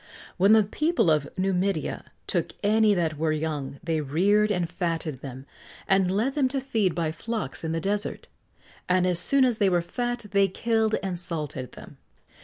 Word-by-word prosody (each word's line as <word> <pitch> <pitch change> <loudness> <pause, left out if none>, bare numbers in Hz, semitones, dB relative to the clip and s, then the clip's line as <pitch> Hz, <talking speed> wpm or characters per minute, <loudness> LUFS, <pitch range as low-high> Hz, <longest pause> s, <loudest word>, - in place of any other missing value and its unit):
When 195 +3 +5
the 220 -1 +6
people 305 - +1
of 150 -2 +1
Numidia 190 -2 -1 0.2
took - - -1
any 215 0 +4
that 160 -4 -1
were 160 0 +1
young, 150 -3 -3
they 165 -2 0
reared 195 +9 +2
and 180 -4 0
fatted 165 -6 -3
them, 130 -1 -8 0.4
and 195 -1 +3
led 220 +8 0
them 275 -3 +2
to 270 +1 -2
feed 220 -10 0
by 165 -2 0
flocks 190 - -4
in 160 - -2
the 165 - -1
Desert; 205 +4 -2 0.6
and 180 0 +3
as 180 -2 +2
soon 270 +8 +3
as 240 -3 0
they 200 -2 +4
were 175 -2 +1
fat 240 +5 -3
they 200 0 +4
killed 220 +3 +1
and 185 -3 -3
salted 150 -7 -5
them. - - -12
185 Hz, 180 wpm, -26 LUFS, 160-215 Hz, 0.6 s, the